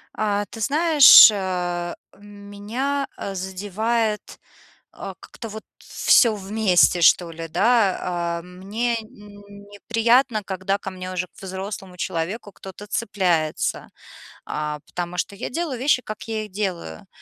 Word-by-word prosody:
А, 205 -1 -1
ты 225 - -11
знаешь, 300 0 +8
а, 180 -3 -3 0.2
меня, 205 +7 -4
э, 195 - -5
задевает, 210 +4 -2 0.5
э, - - -8
как-то 225 - -10
вот 215 0 -8
всё 235 -3 +3
вместе, 195 -3 +2
что 170 +1 +4
ли, 165 0 -7
да. 200 +4 +2 0.4
А, - - -10
мне 200 +7 -3
неприятно, 210 +3 -2
когда 190 +1 -2
ко 195 - -7
мне 185 -1 -7
уже, 180 0 -3
к - - -19
взрослому 190 0 -7
человеку, 180 +6 -4
кто-то 195 +2 -11
цепляется. 185 -8 -1 0.6
А, 150 0 -4
потому 175 0 -5
что 200 - -2
я 200 - -6
делаю 310 -3 -3
вещи, 255 0 +2
как 215 -2 -8
я 220 -1 -3
их 210 - -12
делаю. 180 - -4
205 Hz, 130 wpm, -22 LUFS, 185-220 Hz, 0.6 s, знаешь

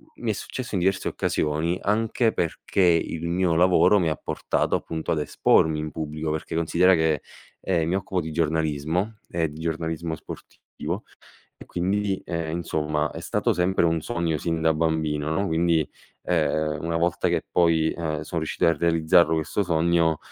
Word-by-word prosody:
mi 120 - -4
è - - +2
successo 125 +3 -5
in - - +1
diverse 95 +1 +1
occasioni, 80 +4 -1
anche 110 +2 +1
perché 85 +3 -2
il 85 -1 +2
mio 85 0 +1
lavoro 90 +4 +5
mi 85 - +1
ha 75 - -1
portato - - -1
appunto, 80 -1 -4
ad 80 - +1
espormi 75 +1 +2
in 75 0 -4
pubblico, 75 0 -4
perché 80 +1 -4
considera 85 +3 +4
che, 80 -3 +1 0.4
ehm, 85 -4 +1
mi 90 - +1
occupo 95 -1 -1
di 80 -1 -6
giornalismo, 80 +5 -1
ehm 85 -1 0
di 75 +1 -10
giornalismo 80 0 -3
sportivo; - - -7 0.5
e - - -12
quindi, 95 +2 -1
ehm, 85 -1 -3
insomma 75 -2 -1
è - - -7
stato - - 0
sempre 90 +1 +1
un 80 -1 +2
sogno 85 -4 -1
sin 80 +2 -2
da 80 0 +3
bambino, 80 -2 0
no, 95 +5 0
quindi, 80 -2 +1 0.4
ehm, 80 -3 0
una 85 0 -1
volta 85 +1 +1
che - - 0
poi, 80 -2 +3
ehm, 80 -3 -3
sono 80 +2 -4
riuscito 80 - 0
a 85 - +5
realizzarlo 85 +1 +3
questo 80 +6 -1
sogno, 85 -2 +2
80 Hz, 170 wpm, -25 LUFS, 80-90 Hz, 0.5 s, lavoro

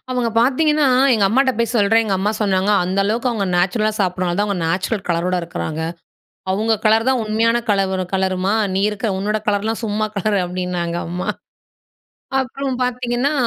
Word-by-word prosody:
அவுங்க 250 -2 0
பாத்தீங்கன்னா 295 +4 +3 0.3
எங்க 205 -3 +2
அம்மாட்ட 260 +5 +3
போய் 235 +1 0
சொல்றேன். 225 +1 +4
எங்க 200 - 0
அம்மா 205 +2 0
சொன்னாங்க, 195 -1 +1
அந்த 185 +2 -2
அளவுக்கு 230 +5 0
அவுங்க 210 -4 -1
நேச்சுரலா 215 +5 +1
சாப்ட்றனால 180 -2 0
தான் 205 - +2
அவுங்க 200 -3 -2
நேச்சுரல் 190 +4 -1
கலரோட 175 +1 0
இருக்குறாங்க. 160 -1 -4 0.7
அவுங்க 215 +4 +1
கலர் 220 +2 +3
தான் 260 -2 +2
உண்மையான 225 +2 +2
கலவுரு 190 -2 +1
கலருமா, 190 0 0 0.2
நீ 195 - +1
இருக்கிற 215 +2 -3
உன்னோட 210 +2 -1
கலர்லாம் 215 +2 -1
சும்மா 215 0 -1
கலரு 205 +1 +1
அப்டின்னாங்க 180 -1 -3
அம்மா. 180 +1 -4 1.1
அப்புறம் 265 +1 -3
பாத்தீங்கன்னா, 250 +2 -1
210 Hz, 155 wpm, -19 LUFS, 190-230 Hz, 1.1 s, சொல்றேன்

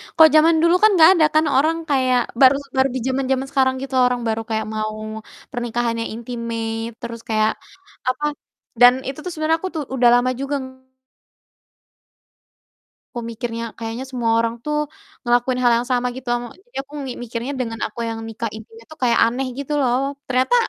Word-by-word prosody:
kalau 320 -1 +8
zaman 320 +2 +6
dulu 340 +1 +5
kan 430 - +8
enggak 320 -1 +8
ada 330 -4 +4
kan 310 0 +4
orang 315 +5 +3
kayak 255 -3 +3 0.2
baru 265 +1 +8 0.2
baru 265 +1 +4
di - - -1
zaman-zaman 265 0 0
sekarang 260 -1 +2
gitu 270 -1 -5
orang 250 -1 0
baru 225 0 -1
kayak 220 -1 -1
mau 215 0 -3 0.5
pernikahan 240 -2 -2
yang 230 - -3
intimate 230 -1 -4
terus 235 0 -6
kayak 215 0 +2 0.6
apa 255 +4 -3 0.6
dan 245 0 +9
itu 270 +2 -5
tuh 360 - -4
sebenarnya 320 0 0
aku 375 - -3
tuh 310 - -1
udah 245 -2 +5
lama 245 +1 +2
juga 275 +1 -2
ng - - -6 2.5
aku 240 - -4
mikirnya 230 0 -4 0.2
kayaknya 230 +2 -4
semua 240 -3 0
orang 230 0 0
tuh 300 0 -1 0.5
ngelakuin 245 +1 +2
hal 240 - +5
yang 240 - -4
sama 250 0 +1
gitu 260 -1 -10
am 240 - -3 0.2
jadi 485 - -11
aku 280 +1 -21
mi 260 - -4
mikirnya 235 +3 -4
dengan 225 -3 -3
aku 215 - -12
yang 225 0 -4
nikah 225 0 -4
intimate 450 - -12
itu - - -9
kayak 240 -1 +3
aneh 250 +3 -1
gitu 280 +1 -4
loh. 250 -1 +2 0.3
Ternyata 255 - +2
250 Hz, 180 wpm, -21 LUFS, 230-275 Hz, 2.5 s, dan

